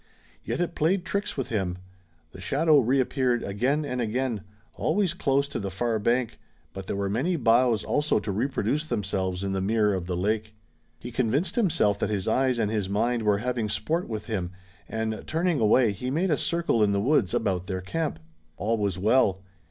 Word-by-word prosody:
Yet - - -3
it 175 -1 -1
played 175 +4 +1
tricks 200 +1 -2
with 135 -1 -2
him. 95 -6 -1 0.5
The 95 - -11
shadow 150 - +4
reappeared 130 -1 +1
again 130 +10 0
and 125 -3 -2
again, 120 -1 -1 0.3
always 200 -4 0
close 140 +1 +1
to - - -3
the 100 - -3
far 110 +4 -1
bank, 120 +2 0 0.3
but 95 -1 -7
there - - -2
were 100 0 -1
many 130 - 0
boughs 115 -4 +3
also 150 +1 +1
to 105 -1 -2
reproduce 135 - -1
themselves 95 -4 -2
in 100 - -1
the 95 0 -1
mirror 105 +1 +2
of 90 -2 -3
the 90 -1 -2
lake. 110 +3 -1 0.4
He 120 +9 -8
convinced 130 +8 0
himself 165 - +2
that - - 0
his 100 -2 -2
eyes 130 +2 +2
and 105 -2 0
his 105 -4 -1
mind 115 +4 +1
were 105 -2 +2
having 120 -4 -1
sport 155 - -1
with 110 -2 -4
him, 95 -7 -2 0.4
and 110 -1 -3
turning 165 -1 +1
away, 110 +1 +4
he 125 +6 -4
made 170 +7 0
a - - +5
little - - +1
circle 170 -9 +1
in 105 -1 +3
the 100 - +1
woods 120 -2 +2
about 95 -6 -1
their 95 -1 -3
camp. 160 - -2 0.4
All 110 +3 0
was 100 -3 0
well. 100 -2 +2
115 Hz, 195 wpm, -26 LUFS, 100-135 Hz, 0.5 s, a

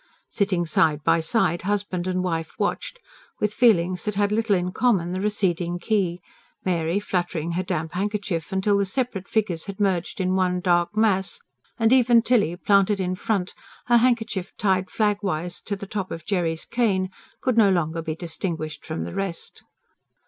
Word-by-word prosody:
Sitting 190 -4 0
side 155 -2 +2
by 165 0 +3
side 170 0 +1
husband 195 -2 -1
and 185 0 0
wife 165 -3 -2
watched, - - -2 0.4
with 210 0 0
feelings 185 -7 +3
that 210 -1 -2
had 205 0 +1
little 215 -1 +2
in 180 0 -1
common, 190 -7 +1
the 185 +1 -2
receding 180 -4 0
quay, 180 -2 0 0.5
Mary 170 0 +1
fluttering 175 -4 -2
her 175 +2 0
damp 170 -4 -3
handkerchief 200 -4 -2
till 205 -1 +3
the 200 - +2
separate 200 -2 -2
figures 195 -7 -1
had 200 0 -7
merged 190 -4 0
in 185 0 +1
one 185 -1 +1
dark 175 +2 +1
mass, 195 -4 +2 0.4
and 225 0 +4
even 240 -3 +5
Tilly, 215 -9 +2
planted 200 +2 +3
in 185 -1 -1
front, 190 0 -1 0.3
her 240 -1 +5
handkerchief 225 -6 +1
tied 190 -2 +1
flagwise 200 -5 -1
to 205 - -2
the 200 - -7
top 195 -1 -4
of 165 -1 -7
Jerry's 170 -5 -1
cane, 195 -6 0 0.3
could 255 -3 0
no 220 -3 +6
longer 165 -3 0
be 160 -1 -4
distinguished 160 -2 -4
from 160 0 -4
the - - -6
rest. 195 -3 -5
185 Hz, 170 wpm, -24 LUFS, 175-210 Hz, 0.5 s, no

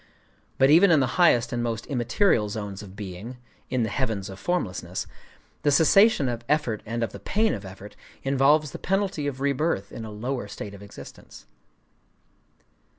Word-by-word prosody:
But 135 +2 +5
even 175 +5 +7
in 160 -3 +5
the 130 +6 0
highest 120 -9 +4
and 120 - -1
most 115 -1 -3
immaterial 120 - +1
zones 100 -1 -5
of 100 -2 -11
being,—in 115 +5 -6
the 110 - -1
Heavens 110 -7 -2
of 95 - -10
Formlessness,—the 150 - -4
cessation 160 - +5
of 120 -1 -3
effort 145 -8 +1
and 115 +1 -2
of 115 - -2
the - - -9
pain 220 +2 +1
of 100 -2 -6
effort, 95 +2 -11 0.3
involves 140 +2 +3
the - - -8
penalty 195 -6 -1
of 135 -2 -5
rebirth 140 -7 0
in 115 - -7
a 110 - -7
lower 120 +2 -4
state 100 0 -7
of 100 - -11
existence. 100 - -12
120 Hz, 160 wpm, -25 LUFS, 105-150 Hz, 0.3 s, even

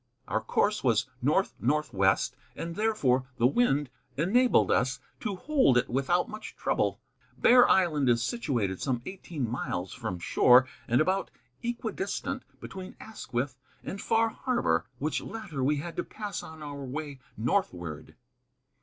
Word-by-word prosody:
Our - - 0
course - - +1
was - - +3 0.2
north - - +2
northwest, 115 -9 +1 0.2
and 165 0 -5
therefore 145 - +1
the 115 - +3
wind 145 - +2 0.3
enabled 240 - +4
us - - +1 0.2
to 210 -4 -3
hold 260 - +3
it 125 - +1
without 140 +8 +1
much 215 0 -8
trouble. - - 0 0.4
Bear 245 0 +6
Island 155 -8 +3
is 120 -1 +3
situated 120 - -1
some 125 -3 -1
eighteen 170 -8 -4
miles 95 -6 -3
from 110 -7 -4
shore, 125 +8 +5 0.2
and 120 +4 +3
about 190 +4 +1 0.3
equidistant 235 +1 -3 0.2
between 190 -1 -8
Asquith 130 - -4 0.2
and 195 - -5
Far 225 0 +2
Harbor, 250 +1 0
which 150 +5 -1
latter 195 -12 -5
we 145 +3 +3
had 165 +4 -5
to - - 0
pass 210 -2 -5
on 160 -1 -10
our 145 -1 -6
way 140 +1 -5 0.2
northward. 90 - -2
150 Hz, 140 wpm, -29 LUFS, 125-205 Hz, 0.4 s, Bear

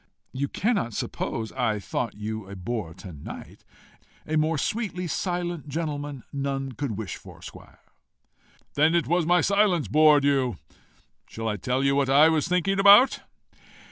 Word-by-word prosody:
"You 140 +2 -2
cannot 170 - -1
suppose 110 -2 -4
I 120 -5 -1
thought 110 +3 -4
you 105 -1 -6
a 100 - -8
bore 95 -3 -5
to 95 -4 -10
night. 75 - -10 0.6
A 155 - -2
more 155 +1 +1
sweetly 195 +1 -2
silent 175 -2 -3
gentleman 145 -3 -4
none 135 -1 -3
could 125 -4 -4
wish 110 -4 -5
for - - -14
squire." - - -13 0.9
"Then 155 +3 +3
it 170 - +2
was 175 -1 +1
my 175 0 +4
silence 200 -6 +2
bored 150 -1 +5
you. 135 -4 +1 0.7
Shall 115 0 -6
I 105 -1 -1
tell 125 +7 -1
you 140 0 +2
what 140 -1 +1
I 145 +4 +6
was 160 -2 +1
thinking 180 +2 0
about?" 205 +6 +7
145 Hz, 155 wpm, -25 LUFS, 120-170 Hz, 0.9 s, about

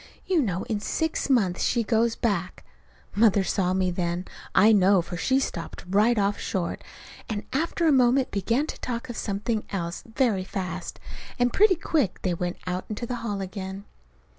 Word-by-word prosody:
You 360 -4 +2
know 190 -7 -1
in 215 -2 -2
six 320 +8 -1
months 200 -9 +2
she 235 -2 +2
goes 230 +1 +2
back 195 -6 -2 0.2
" - - -26
Mother 205 -2 +4
saw 185 -1 0
me 185 -1 +1
then, 175 0 -2 0.3
I 215 - +7
know; 195 -2 +5
for 175 - -7
she 260 +9 +2
stopped 170 -10 -5
right 210 +5 +3
off 200 0 +1
short, 175 -3 -3 0.5
and 210 -2 -3
after 330 +4 0
a - - +5
moment 255 0 +4
began 230 +8 +1
to - - -7
talk 235 0 -4
of - - -8
something 210 +2 -2
else, 170 -2 -3
very 225 -8 +2
fast. 190 -1 -5 0.4
And 245 -1 +2
pretty 405 -2 +5
quick 300 - -1
they 185 - +1
went 175 +1 -3
out 180 0 -3
into 215 +2 -4
the 245 +1 -3
hall 205 -4 -3
again. 190 +1 -6
205 Hz, 180 wpm, -26 LUFS, 185-245 Hz, 0.5 s, I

